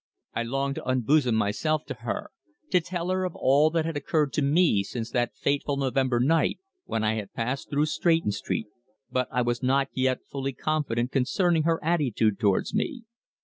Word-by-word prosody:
I - - -1
longed 135 +4 -1
to - - -6
unbosom 130 0 +3
myself 110 +9 0
to - - -5
her - - -5 0.4
to 180 - +4
tell 175 +1 -4
her 185 0 0
of 180 -2 -3
all 145 +4 +4
that 160 0 0
had 165 -1 -3
occurred 145 0 0
to - - +1
me 145 - +3
since 115 +3 -5
that 120 -1 0
fateful 140 0 0
November 130 -2 +1
night 155 +6 +2 0.3
when 110 - -2
I 110 0 +2
had 105 -3 -6
passed 125 +4 -3
through 145 +1 +2
Stretton 165 - +1
Street, 105 +2 -3 0.5
but 130 -1 0
I 125 - +1
was 120 +1 -1
not 135 +1 +2
yet 130 -1 0
fully 135 -1 -3
confident 125 -4 -1
concerning 160 +5 +2
her 165 - +2
attitude 130 - +1
towards 100 -4 +1
me. 240 +3 -2
135 Hz, 185 wpm, -26 LUFS, 120-155 Hz, 0.5 s, to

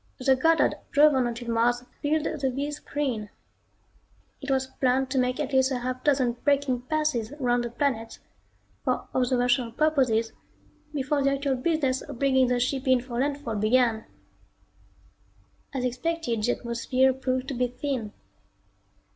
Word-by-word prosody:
The 265 +1 +3
Goddard 325 +5 +3 0.2
drove 300 0 +5
on 260 -2 +2
until 235 0 -4
Mars 240 +1 +2 0.2
filled 300 +1 +1 0.2
the 265 - +1
viz 285 +3 -3
screen. 250 -8 -3 1.1
It 275 - -6
was 265 -1 +1
planned 260 0 0
to 265 - +1
make 250 +1 0
at 290 -2 -3
least 265 0 +3
a 260 - 0
half 255 +1 -4
dozen 265 -4 +3
braking 280 -4 +1
passes 275 -4 -1
around 245 -4 +1
the 240 - -3
planet 235 -2 -2 0.7
for - - -1
observational 245 -1 +1
purposes 250 -6 +1 0.6
before 285 0 -1
the 275 0 +2
actual 275 -1 0
business 270 -1 0
of - - -9
bringing 265 -1 +3
the 245 0 +1
ship 260 +2 -1
in 260 -1 +5
for 240 -1 -5
landfall 275 -5 -2
began. 225 +1 +2 1.7
As 260 -3 -2
expected 250 -2 -2
the 245 +3 +2
atmosphere 255 +2 +1
proved 260 0 -2
to - - -3
be 250 0 0
thin. 250 -3 -4
255 Hz, 150 wpm, -26 LUFS, 245-280 Hz, 1.7 s, drove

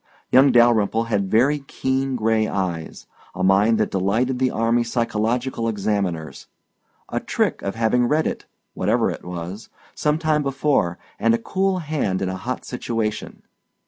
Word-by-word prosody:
Young 135 +1 +6
Dalyrimple 115 -2 +3
had 100 -3 0
very 135 +8 +3
keen 135 -1 -2
gray 110 -1 +1
eyes, 90 -5 -4 0.3
a 95 - -3
mind 100 +4 +4
that 110 - 0
delighted 110 +7 0
the 130 -1 +2
army 115 +1 +1
psychological 115 +1 -1
examiners, 100 -6 -2 0.6
a - - -1
trick - - -1
of 100 - -4
having 115 +2 +2
read 155 +4 +1
it - - -4 0.3
whatever - - +1
it - - -8
was 90 +4 -7 0.2
some 150 0 0
time 155 -2 +1
before, 135 - 0 0.2
and 115 +1 +3
a - - 0
cool 190 +10 0
hand 110 -12 -1
in 95 - -1
a 95 - -3
hot 125 +7 -5
situation. 115 -3 -4
115 Hz, 150 wpm, -22 LUFS, 100-130 Hz, 0.6 s, Young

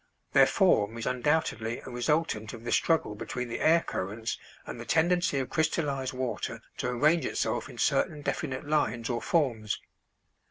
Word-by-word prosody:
Their - - +7
form 105 +3 +3
is 115 - -4
undoubtedly 125 -3 0
a 130 - -7
resultant 120 -4 0
of 115 -1 -9
the 120 - -3
struggle 160 -10 +2
between 125 +3 -5
the 115 - -3
air 165 +2 +5
currents 110 - -4 0.3
and - - -7
the - - -5
tendency 175 -2 +2
of 130 -2 -2
crystallized 145 -4 0
water 125 -5 -3
to - - -2
arrange 150 +6 +3
itself - - -1
in - - -11
certain 150 -2 +1
definite 135 -4 -3
lines 125 -6 0
or 120 - -2
forms. 120 -10 0
130 Hz, 160 wpm, -29 LUFS, 115-155 Hz, 0.3 s, Their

